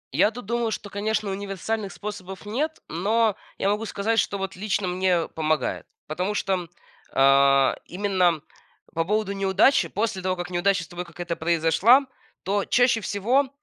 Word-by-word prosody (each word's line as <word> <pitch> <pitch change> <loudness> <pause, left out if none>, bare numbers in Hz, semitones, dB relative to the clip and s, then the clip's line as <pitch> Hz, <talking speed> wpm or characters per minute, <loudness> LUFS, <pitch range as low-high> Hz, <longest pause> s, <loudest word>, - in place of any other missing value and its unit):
Я - - +5
тут 240 +1 -9
думаю, 235 +1 0
что, 210 -1 -5
конечно, 210 0 -1
универсальных 200 +1 -3
способов 200 -2 -7
нет, 290 +10 -2
но 210 +6 +1 0.2
я - - 0
могу 210 +2 0
сказать, 225 +3 0
что 200 - 0
вот 195 -1 -4
лично 200 0 -1
мне 180 -2 +1
помогает, 155 -4 -1 0.2
потому 180 +7 -2
что, 185 -4 -1 0.4
а, 135 0 +5
именно 180 -4 +1 0.5
по 165 0 0
поводу 210 +1 0
неудачи. 195 +7 +3
После 210 -3 -2
того, 185 0 0
как 175 0 -6
неудача 185 +1 +1
с - - -12
тобой 175 +3 -6
какая-то 170 0 -5
произошла, 170 - +4 0.4
то 200 +1 0
чаще 245 -2 +3
всего, 240 +8 +1
195 Hz, 155 wpm, -24 LUFS, 175-215 Hz, 0.5 s, Я